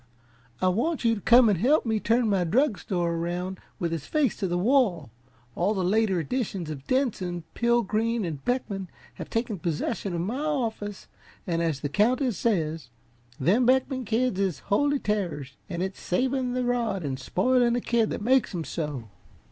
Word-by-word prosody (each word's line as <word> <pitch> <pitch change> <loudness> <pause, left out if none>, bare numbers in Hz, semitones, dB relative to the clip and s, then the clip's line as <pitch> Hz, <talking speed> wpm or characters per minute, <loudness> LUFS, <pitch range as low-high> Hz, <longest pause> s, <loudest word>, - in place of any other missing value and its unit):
"I - - +5
want 245 - 0
you 230 - +4
to 210 - -4
come 235 +5 +6
and 200 -5 +2
help 270 - +3
me 220 -2 +1
turn 230 +2 +2
my 195 -4 +2
drug 225 - +2
store 175 -3 -1
around 175 +3 -3 0.2
with 170 -4 -2
its 155 -3 -4
face 295 -7 +1
to 195 - -1
the 175 0 -1
wall. 195 - +2 0.4
All 200 +5 +1
the 190 - 0
later 195 0 +2
editions 185 - -3
of 140 -3 -8
Denson, 190 - -1
Pilgreen 230 -2 +1
and 150 -5 -5
Beckman 200 -7 -2 0.3
have - - -7
taken 225 -4 -2
possession 175 +3 -2
of 170 - -1
my 220 +10 -2
office 225 -9 -2 0.4
and 170 -1 -1
as 160 -5 -1
the 145 - -2
Countess 245 - +2
says: 160 - 0 0.5
'Them 205 - +3
Beckman 260 0 +2
kids 230 -2 0
is 190 -7 0 0.2
holy 285 +6 +3
terrors 175 - -2
an' 175 -1 -2
it's 190 0 -5
savin' 255 +5 0
the 250 0 -1
rod 230 -8 -1
an' 135 -2 -2
spoilin' 240 - +2
the 245 - +1
kid 230 -2 +1
that - - -4
makes 255 -4 +2
'em 165 - -2
so!'" 150 -8 -4
205 Hz, 180 wpm, -26 LUFS, 175-245 Hz, 0.5 s, come